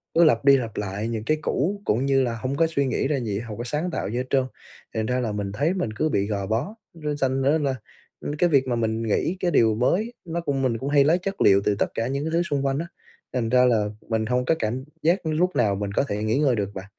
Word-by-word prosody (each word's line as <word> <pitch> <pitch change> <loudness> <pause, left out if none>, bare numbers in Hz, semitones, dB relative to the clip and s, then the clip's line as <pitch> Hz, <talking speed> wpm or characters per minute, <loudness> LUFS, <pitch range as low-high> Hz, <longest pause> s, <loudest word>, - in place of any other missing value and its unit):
cứ 170 - +6
lặp 135 -6 +3
đi 140 -1 +7
lặp 115 -4 -5
lại 105 +2 -3
những 115 -2 -3
cái 155 +3 +2
cũ, 185 +7 -1
cũng 120 +5 +1
như 135 -1 +3
là 120 -2 -1
hông 130 +4 -3
có 165 - +4
suy 140 -4 0
nghĩ 130 - 0
ra 140 -1 0
gì, 105 -4 -2
hông 115 -3 -7
có 120 - -4
sáng 150 +8 -2
tạo - - -3
gì 115 - -3
hết 125 - -1
trơn, 135 -2 +2 0.5
thì - - -5
thành 110 - 0
ra 125 +2 0
là 120 -4 -1
mình 100 -1 -3
thấy 145 - 0
mình 180 - -2
cứ 155 +9 0
bị 100 -7 0
gò 100 -2 -2
bó. 125 - -2 0.2
Nó 150 -3 -3
sành 135 -1 0
ra 145 +4 +3
là, 135 -2 0 0.5
ưm, - - -4
cái 175 +2 +3
việc 135 -3 +3
mà 125 - 0
mình 115 -1 -1
nghĩ 115 - 0
cái 180 - 0
điều 110 -6 +4
mới 185 - +1
nó 170 0 -3
cũng 140 -4 -1
mình 115 -3 +1
cũng 135 +4 -4
hay 145 -1 +5
lấy 160 +5 +4
chất 195 +2 -4
liệu 100 0 +6
từ 105 - +2
tất - - +2
cả 115 - -1
những 140 +2 -2
cái 160 - -2
thứ 170 +1 +2
xung 145 -4 -1
quanh 135 +1 0
á, 170 - -4 0.5
thành 115 -3 -1
ra 125 +1 +5
là 115 -4 +3 0.2
mình 110 -1 0
hông 125 +2 0
có 160 - +3
cảm 120 +4 -2 0.2
giác 170 +3 +2
lúc 165 +4 +1
nào 105 -4 +2
mình 100 0 -3
có - - +2
thể 105 +1 -2
nghỉ 110 +3 +1
ngơi 135 -5 +3
được 100 -1 -3
bạn. 95 -1 -7
130 Hz, 290 wpm, -24 LUFS, 110-150 Hz, 0.5 s, đi